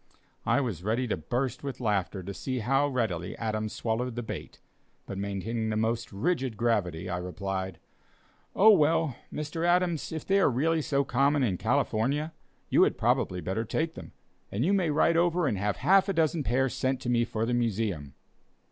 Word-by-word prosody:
I 140 - +3
was 105 - -3
ready 115 +5 0
to - - +1
burst 120 - -2
with 135 -3 -5
laughter 100 -4 -1
to 100 +3 -6
see 130 +5 -3
how 135 +5 +2
readily 110 - -2
Adams 110 -1 -2
swallowed 120 +1 -2
the 120 - -3
bait, - - -7 0.5
but 100 - -6
maintaining 100 +3 -2
the 110 - -1
most 115 +1 -1
rigid 130 - -1
gravity, 95 -7 0
I 90 -1 -2
replied: 95 0 -4 0.8
"Oh 215 +3 +8
well, 160 - +3 0.2
Mr. 150 +2 -4
Adams, 175 -2 +1
if 160 -1 -5
they 195 +1 +3
are 190 - +4
really 155 +6 +1
so 140 -1 +1
common 140 +2 +2
in 100 -7 +1
California, 140 +6 0 0.3
you - - +3
had - - +3
probably 90 -1 +1
better 95 +7 -2
take 160 +8 -1
them, - - -10 0.4
and 110 +7 0
you 195 - +3
may 185 -5 +2
write 160 +2 +3
over 175 0 +2
and 110 -9 0
have 105 0 -1
half 195 +1 +4
a - - +1
dozen 160 -1 +1
pairs 130 0 +1
sent 130 0 0
to - - -6
me 120 -1 +3
for 110 -1 -2
the 120 - -1
Museum." 105 - -1
120 Hz, 185 wpm, -28 LUFS, 105-150 Hz, 0.8 s, Oh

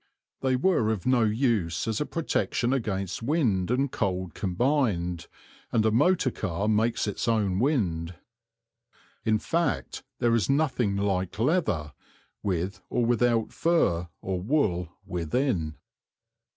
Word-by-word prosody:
They 130 -1 +1
were 125 - +2
of 110 -5 -2
no 130 -1 +3
use 105 - 0
as 110 +2 -1
a 150 - -1
protection 135 -6 0
against 100 -7 -2
wind 115 - +1
and 130 +2 +1
cold 95 -3 -2
combined, 90 - 0 0.4
and 110 -1 +2
a 110 - +4
motor 145 +3 +3
car 100 0 -2
makes 110 +2 +2
its 105 +3 -3
own 105 -5 +1
wind. 90 - 0 1.1
In 110 -1 +3
fact, 145 - -1 0.2
there 120 -1 +2
is 115 -5 +1
nothing 130 -8 +1
like 95 -2 -1
leather, 110 - 0 0.5
with 95 0 -2
or 120 - +1
without 120 -1 +2
fur 90 - +2 0.2
or 95 -2 -2
wool 95 - +1 0.2
within. 90 - -1
110 Hz, 125 wpm, -27 LUFS, 90-130 Hz, 1.1 s, a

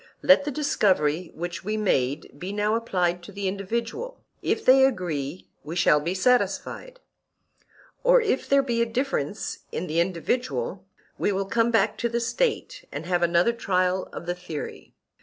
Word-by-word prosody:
Let 280 +1 +6
the - - -1
discovery 185 - +1
which 175 +2 -5
we 215 +3 -2
made 145 -8 0
be 185 +4 -5
now 210 +1 0
applied 180 -6 0
to 175 - -11
the 200 0 -3
individual—if 235 - -4
they 265 +1 +7
agree, 175 - -1 0.2
we 155 +4 -6
shall 170 -4 +4
be 170 +5 -2
satisfied; 250 - 0 1.0
or, - - +6
if 430 - -1
there 275 0 +5
be 235 -3 0
a - - +3
difference 230 - -2
in 175 - -3
the 165 -1 -1
individual, 245 - -1 0.3
we - - +1
will 195 0 -1
come 230 +4 +2
back 220 -2 +2
to 235 - 0
the 235 +1 -1
State 480 - -1
and - - -6
have 175 0 0
another 170 +6 +3
trial 185 -4 0
of - - -7
the 175 - -1
theory. 175 -4 -8
200 Hz, 160 wpm, -25 LUFS, 175-250 Hz, 1.0 s, they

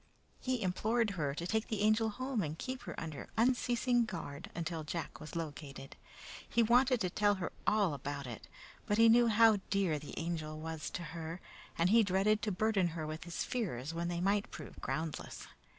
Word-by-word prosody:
He 255 -3 -1
implored 215 +4 +1
her 150 -7 -2
to 170 - -4
take 220 +4 0
the 215 -3 -2
Angel 215 +1 +4
home 255 +1 -2
and 155 -2 -3
keep 255 +4 -4
her - - -5
under 155 -3 -6
unceasing 245 0 +3
guard 160 -6 -6
until 165 -1 -3
Jack 165 +2 -5
was 155 - -9
located. 145 -4 -6 0.5
He 235 - +4
wanted 245 +2 +4
to 180 -3 0
tell 205 +1 +3
her 185 -2 -3 0.2
all 205 -6 +3
about 140 0 -4
it, 120 -3 -8 0.4
but 205 - +2
he 230 0 +7
knew 235 +1 +6
how 225 -1 +6
dear 190 -7 +1
the 145 -1 -9
Angel 160 -2 -3
was 160 0 -4
to 175 - -5
her, 165 +1 -5 0.4
and 170 +3 +3
he 230 +1 +7
dreaded 205 +2 +2
to 215 - -1
burden 200 -1 +2
her 155 - -2
with 155 +1 -5
his 175 - -3
fears 165 - -3
when 170 +1 -2
they 175 0 -2
might 200 +3 +1
prove - - -9
groundless. 160 -1 -4
185 Hz, 190 wpm, -34 LUFS, 160-220 Hz, 0.5 s, he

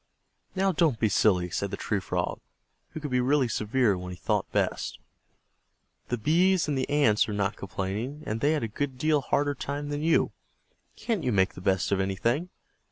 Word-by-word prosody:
"Now 195 0 +2
don't 155 -8 +2
be 110 - +2
silly," 90 -3 +2
said 100 +2 -2
the - - -5
Tree 105 - -1
Frog, 95 - -2 0.5
who - - -7
could 145 -3 -5
be 125 - +2
really 130 +1 +3
severe 110 0 +1
when 90 0 -6
he - - -6
thought - - -1
best, - - -1 1.1
"the 120 - -1
Bees 175 - +3
and 145 - 0
the 130 - -1
Ants 130 -8 +3
are - - -2
not 100 0 0
complaining, 100 +10 -4
and 110 +1 -3
they 145 +2 +3
had 150 - -1
a - - 0
good 130 +4 -3
deal 150 +1 +2
harder 145 +1 +1
time 145 +1 -4
than 145 0 -2
you. 165 +1 +3 0.6
Can't 220 -8 -2
you 125 - +1
make 95 -3 +2
the - - -10
best 95 -1 +1
of 100 - +2
anything? 115 - 0
125 Hz, 195 wpm, -27 LUFS, 100-150 Hz, 1.1 s, really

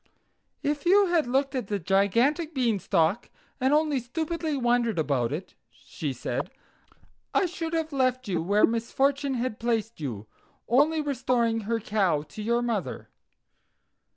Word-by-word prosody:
"If 290 0 -1
you 400 +2 +6
had 330 -6 +2
looked 270 +2 +1
at 250 -6 -3
the 205 - -1
gigantic 230 - +1
Beanstalk 205 -5 +1 0.3
and 260 +1 +2
only 300 -2 +2
stupidly 315 +4 -3
wondered 240 -4 +1
about 140 -6 0
it," 165 +6 -5 0.2
she - - -6
said, - - -3 0.9
"I 395 - +4
should 335 -2 -4
have 320 -2 -1
left 255 -2 +1
you 175 -4 0
where 200 +5 +4
misfortune 270 +4 0
had 240 -2 -2
placed 225 -4 -1
you, 115 -8 -4 0.4
only 295 +6 +3
restoring 250 -5 0
her 230 -1 +1
cow 195 -9 +1
to 155 +8 -10
your 235 +3 +1
mother. 225 -7 -3
240 Hz, 140 wpm, -27 LUFS, 205-285 Hz, 0.9 s, you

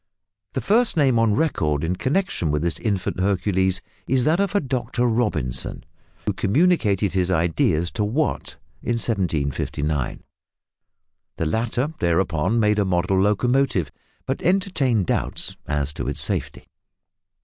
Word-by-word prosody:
The 130 - -2
first 225 -1 +3
name 135 -6 +4
on 110 -2 +3
record 75 - 0
in 85 +3 0
connexion 135 - -1
with 75 +1 0
this 85 -2 -1
infant 100 -5 -2
Hercules 95 -1 +1 0.3
is 130 0 +2
that 160 +4 +3
of 200 -6 0
Dr 125 -1 -1
Robison, 105 - -1 0.4
who - - 0
communicated 105 - +2
his 90 -1 +1
ideas 85 -1 +1
to 105 - -2
Watt 135 +9 -1 0.2
in 120 - -1
1759. 80 - -1 1.1
The 80 - -2
latter 120 - -1
thereupon 85 +4 +1
made 105 -1 +2
a - - +3
model 95 +1 +1
locomotive, 105 - +1 0.3
but 135 +1 -2
entertained 155 - +1
doubts - - -1
as 75 -1 -1
to - - -5
its - - -3
safety. - - -3
105 Hz, 130 wpm, -23 LUFS, 85-130 Hz, 1.1 s, name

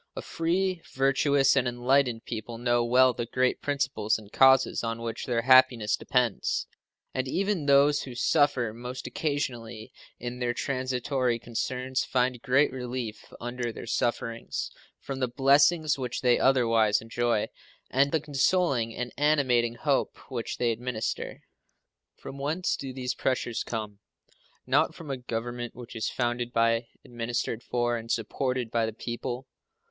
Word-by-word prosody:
A - - -5
free, 180 +2 -1
virtuous, 135 0 +3
and 130 -2 +2
enlightened 120 -1 +1
people 115 +1 -5
know 120 0 +2
well 125 +2 +5
the 120 0 -4
great 130 +1 0
principles 135 -7 0
and 105 -2 -14
causes 135 0 +5
on 115 0 -3
which 115 -1 -4
their 115 -2 0
happiness 130 -4 +5
depends, 125 -5 0 0.5
and 130 0 -2
even 190 0 -1
those 145 +1 +5
who 130 -2 -8
suffer 125 -2 +2
most 125 +2 -7
occasionally 120 -7 -3 0.2
in 120 +1 -6
their 120 -1 -1
transitory 130 -2 -1
concerns 125 +3 -2
find 125 -1 0
great 130 +4 +3
relief 125 -3 -5
under 120 0 -3
their - - -8
sufferings 115 0 -2 0.3
from 135 -1 -6
the 130 - +1
blessings 140 +4 +3
which 125 -2 -3
they 125 -1 +4
otherwise 115 -5 +3
enjoy 115 -1 0 0.4
and 140 +2 +4
in - - -6
the 160 - +1
consoling 140 -5 +1
and 125 0 -4
animating 130 -6 +2
hope 140 +2 0
which 120 -3 -4
they 120 -1 +1
administer. 115 0 -4 0.7
From 140 - -9
whence 160 +6 -1
do 135 -1 -6
these 125 -1 -3
pressures 120 -2 -1
come? 105 -3 -5 0.7
Not - - +2
from 155 -4 -7
a 135 - -2
Government 120 0 -5
which 120 0 -10
is 110 - -1
founded 120 -1 -2
by, 115 0 +2 0.2
administered 120 -1 -3
for, 120 -1 0
and 115 0 -8
supported 125 +1 -1
by 115 -1 +1
the 110 - -4
people. 120 +3 -5
125 Hz, 145 wpm, -28 LUFS, 115-135 Hz, 0.7 s, well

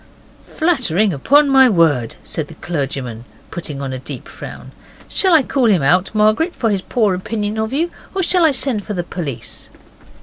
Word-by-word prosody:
'Flattering, 225 - +1
upon 285 - +4
my 265 -2 +6
word,' 155 - +2
said 155 -2 -3
the - - -13
clergyman, 135 -8 -4 0.3
putting 150 -5 -5
on 135 -1 -4
a 130 - -5
deep 130 - -8
frown. - - -10 0.4
'Shall 380 - +2
I 305 - +5
call 255 -1 +1
him 190 -9 +3
out, 180 +7 +3
Margaret, 215 +12 +2
for 225 -3 0
his 195 -2 0
poor 215 -1 +1
opinion 210 +3 -3
of 220 0 -2
you, 330 +6 -1 0.2
or 380 - 0
shall 355 0 +3
I 320 - +6
send 250 -5 0
for 210 - -5
the 175 - -2
police? 160 -8 -6
205 Hz, 180 wpm, -18 LUFS, 160-265 Hz, 0.4 s, my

